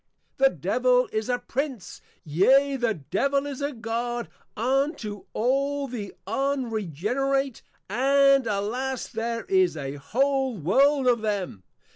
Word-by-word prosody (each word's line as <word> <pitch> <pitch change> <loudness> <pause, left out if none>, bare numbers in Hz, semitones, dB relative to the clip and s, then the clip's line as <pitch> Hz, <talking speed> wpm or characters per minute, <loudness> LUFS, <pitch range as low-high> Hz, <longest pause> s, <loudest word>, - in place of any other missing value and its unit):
_ - - -50
The 270 - +8
Devil 250 - +2
is 220 +2 -2
a 245 - +2
Prince, 265 - -4 0.2
yea, 265 - +4
the 240 -4 0
Devil 275 - 0
is 285 -1 -5
a 285 +1 -1
God 235 0 -3 0.3
unto 245 - -1
all 275 +4 0
the 225 -6 -6
Unregenerate; 265 - -1 0.3
and 275 +3 +4
alas, 235 +6 -2
there 230 0 -3
is 375 - +2
A 140 -1 -5
whole 265 - 0
World 270 - +3
of 240 -3 +3
them. 200 - -2
250 Hz, 125 wpm, -26 LUFS, 215-275 Hz, 0.3 s, The